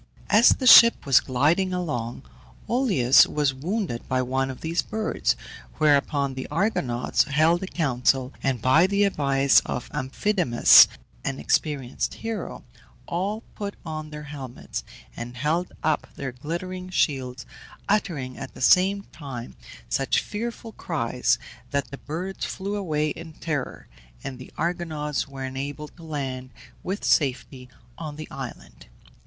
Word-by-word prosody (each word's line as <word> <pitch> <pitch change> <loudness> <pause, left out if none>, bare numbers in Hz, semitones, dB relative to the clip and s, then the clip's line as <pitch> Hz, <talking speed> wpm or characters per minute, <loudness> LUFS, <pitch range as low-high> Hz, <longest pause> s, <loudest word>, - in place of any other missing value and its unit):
As 220 +3 +7
the 260 - +1
ship 235 -1 +9
was 135 -3 +6
gliding 165 +9 +1
along, 130 -8 -3 0.4
Oileus 195 - +5
was 145 -3 0
wounded 160 - -3
by 130 0 +1
one 130 +1 -1
of 130 - -8
these 165 +2 0
birds, 220 0 -1 0.4
whereupon 145 -2 +2
the 130 0 -6
Argonauts 125 - 0
held 155 +5 +3
a 190 - -4
council, 135 -5 0
and 130 -5 -1
by 155 +8 +5
the 200 +1 +2
advice 140 -7 +4
of 125 - -5
Amphidamas, 135 - +5 0.4
an 135 - -2
experienced 140 -5 -1
hero, 225 -4 -5 0.4
all 200 +6 -2
put 200 -1 -5
on 155 -1 -5
their 150 0 -8
helmets, 140 -4 -7 0.3
and 120 +1 -7
held 160 +7 0
up 155 -1 0
their 135 -2 -4
glittering 180 +8 -5
shields, 130 -7 -1 0.4
uttering, 155 -11 -1
at 135 - -8
the - - -11
same 190 +8 +4
time, 130 -6 -8 0.3
such 135 - +1
fearful 230 +1 -5
cries 125 - 0 0.3
that 140 -1 -2
the 140 - -8
birds 180 +6 -5
flew 200 +2 -3
away 155 -6 -1
in 160 +1 -8
terror, 150 -4 -4 0.4
and 130 -2 -6
the 130 - -11
Argonauts 160 -4 -2
were 135 -1 -6
enabled 140 +3 -6
to 175 - -15
land 135 -5 -4 0.3
with 195 +3 -4
safety 130 -2 0 0.3
on 155 -3 -6
the 155 0 -7
island. 130 - -9
150 Hz, 135 wpm, -25 LUFS, 130-180 Hz, 0.4 s, ship